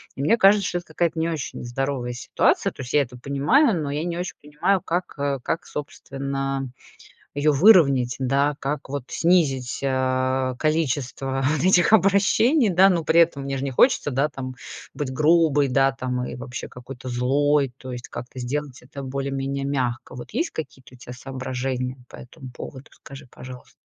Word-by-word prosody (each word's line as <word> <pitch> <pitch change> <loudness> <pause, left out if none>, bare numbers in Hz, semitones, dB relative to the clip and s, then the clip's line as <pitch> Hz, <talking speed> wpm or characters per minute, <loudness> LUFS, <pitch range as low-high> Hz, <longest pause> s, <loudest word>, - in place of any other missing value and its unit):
И 135 - -5
мне 225 +11 +3
кажется, 200 -1 +5
что 175 - -2
это 175 - -8
какая-то 170 -2 -1
не 165 +1 0
очень 155 -6 -5
здоровая 125 0 -3
ситуация. 120 - +1
То - - -10
есть 125 - -8
я 145 - +5
это 125 -2 -6
понимаю, 155 - +2
но 145 - -3
я 150 +3 -2
не 170 -1 -3
очень 180 - -4
понимаю, 150 +6 0
как, 175 +2 -3
э, 140 -1 -1
как, 175 +7 -3
собственно, 135 -2 -4 0.6
ее 145 +1 +2
выровнять, 140 - +5
да? 140 +3 +1
Как 140 0 -4
вот 140 -3 -4
снизить, 150 -8 +1
э, 130 -1 0
количество 135 -3 -1
вот 150 0 0
этих 185 +2 +4
обращений, 210 - +4
да? 190 +2 +5
Но 170 -3 +1
при 165 +2 +5
этом 150 -5 +1
мне 135 0 -3
же 135 - -4
не 135 - -2
хочется, 145 - +3
да, 135 +4 +1
там, 130 -2 -6 0.4
быть 140 -3 -4
грубой, 155 -1 +3
да, 135 +1 +3
там, 125 -1 -3
и - - -6
вообще 125 0 -7
какой-то 125 +1 -10
злой, 135 +2 +1
то 130 -1 -9
есть 125 0 -7
как-то 125 +1 -9
сделать 135 +2 -4
это 140 +2 -9
более-менее 135 +1 -3
мягко. 125 -4 -2
Вот 125 - -9
есть 330 +2 -1
какие-то 130 -5 -8
у - - -17
тебя 125 0 -10
соображения 130 0 -4
по - - -12
этому 125 +1 -11
поводу? 130 +2 -10
Скажи, 135 -1 -13
пожалуйста? 125 0 -11
140 Hz, 180 wpm, -23 LUFS, 130-160 Hz, 0.6 s, кажется